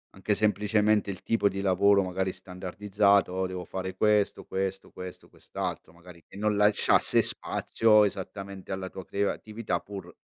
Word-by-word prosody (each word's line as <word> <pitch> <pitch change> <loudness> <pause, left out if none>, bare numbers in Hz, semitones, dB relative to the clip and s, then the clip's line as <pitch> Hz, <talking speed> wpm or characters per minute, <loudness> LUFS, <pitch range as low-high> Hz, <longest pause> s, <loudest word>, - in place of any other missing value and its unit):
anche 95 +2 0
semplicemente 105 0 +2
il 95 - -9
tipo 115 -3 +2
di 100 0 -4
lavoro, 100 +1 +4
magari, 95 0 -2
standardizzato: 95 +1 0
"Devo 90 -1 -5
fare 95 0 -5
questo, 105 0 +2
questo, 95 0 -3
questo, 90 -1 -9
quest'altro", - - -6
magari 85 -1 -15
che - - -14
non 105 0 +1
lasciasse 105 0 +3
spazio 105 -2 +2
esattamente 100 0 -6
alla 95 -1 -4
tua 95 -1 -9
creatività, 100 -1 -2
pur 100 -1 -9
100 Hz, 140 wpm, -28 LUFS, 95-105 Hz, -, lavoro